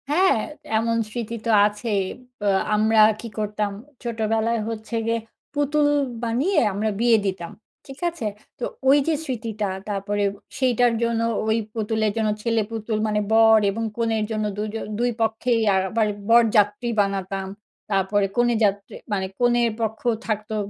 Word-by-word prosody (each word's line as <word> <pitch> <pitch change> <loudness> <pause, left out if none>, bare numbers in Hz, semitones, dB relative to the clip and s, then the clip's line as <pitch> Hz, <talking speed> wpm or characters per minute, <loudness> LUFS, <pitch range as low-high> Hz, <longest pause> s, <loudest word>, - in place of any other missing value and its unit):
হ্যাঁ, 365 +3 +4 0.4
এমন 230 +1 +1
স্মৃতি 230 0 -4
তো - - -1 0.2
আছেই। 210 -1 -1 0.4
বা 205 - -2 0.3
আমরা 220 +1 +3 0.2
কি 235 - -6
করতাম? 210 -1 -1 0.3
ছোটোবেলায় 225 0 0
হচ্ছে 225 +1 -5
গিয়ে 230 0 +1 0.3
পুতুল 290 0 +2 0.4
বানিয়ে 270 +11 +1
আমরা 210 +3 -1
বিয়ে 235 -1 +5
দিতাম। 185 -3 -3 0.4
ঠিক 270 0 -10
আছে? 335 -9 -7 0.3
তো - - -6 0.3
ওই 280 - +7
যে, 325 - +3
স্মৃতিটা 220 -5 -3 0.2
তারপরে 205 0 -1 0.4
সেইটার 245 -2 +3
জন্য 230 -1 0 0.3
ওই 220 +1 +2 0.2
পুতুলের 220 -1 0
জন্য, 220 -1 +1
ছেলে 230 -1 +1
পুতুল 220 -1 -2
মানে 210 0 +1
বর 225 0 +6
এবং 225 +3 -3
কনের 225 -2 0
জন্য 215 -1 -1
দুজ 210 0 -3 0.3
২ 245 +1 +2
পক্ষেই 225 +1 +1
আবার 200 +4 +1 0.2
বরযাত্রী 225 -1 +4
বানাতাম। 195 -1 -2 0.4
তারপরে 195 +1 +2
কনেযাত্রী 220 -4 +1 0.2
মানে, 190 -2 0
কনের 240 -1 +3
পক্ষ 220 0 -2 0.2
থাকতো, 215 0 -2
220 Hz, 140 wpm, -23 LUFS, 210-235 Hz, 0.4 s, ওই